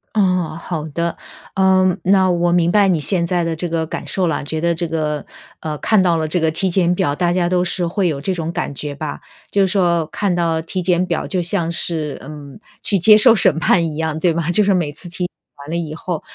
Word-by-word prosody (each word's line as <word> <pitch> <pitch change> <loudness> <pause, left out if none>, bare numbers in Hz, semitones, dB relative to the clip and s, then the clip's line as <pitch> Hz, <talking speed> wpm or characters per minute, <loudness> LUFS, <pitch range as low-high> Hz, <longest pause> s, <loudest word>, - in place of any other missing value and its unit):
哦， 180 -5 +1
好 160 -3 -4
的。 170 +3 -3 0.4
呃， 190 -1 +3
那 190 -1 +3
我 175 0 +1
明 175 -1 +2
白 205 -2 +4
你 170 -5 +1
现 170 0 +1
在 175 -1 0
的 165 -1 -1
这 175 +2 -4
个 165 -1 -1
感 - - -6
受 185 -2 0
了。 145 -3 -2
觉 160 +1 -3
得 170 0 +1
这 170 0 -3
个 155 -2 -2 0.3
呃， 155 -1 -4
看 215 -3 +3
到 175 -2 +2
了 160 -1 -1
这 175 +3 -1
个 160 0 +2
体 190 +4 -1
检 180 -1 +2
表， 175 -7 0
大 175 +2 0
家 175 -1 +1
都 180 0 +1
是 175 0 -1
会 180 +2 0
有 140 -3 -2
这 190 +4 -1
种 165 -2 -4
感 145 - -3
觉 145 +1 -6
吧。 150 0 -5 0.3
就 200 - +2
是 190 - +4
说， 175 -4 +1
看 195 0 -1
到 165 -2 0
体 180 +3 -4
检 180 0 +1
表 170 -2 -2
就 185 -2 -1
像 170 -1 -1
是， 160 -3 -2
嗯， 150 +5 -10 0.2
去 200 - +2
接 210 +4 +7
受 230 +1 +7
审 175 -5 +3
判 170 -1 +3
一 150 - -7
样， 160 -1 -2
对 170 0 +1
吧？ 165 0 -2
就 210 +4 +3
是 200 0 +2
每 165 -5 0
次 175 +3 -4
体 180 +1 -4
检 - - -1 0.4
完 - - -11
了 170 - -3
以 155 -2 -4
后， 170 -1 -4
170 Hz, 265 characters per minute, -18 LUFS, 160-185 Hz, 0.4 s, 接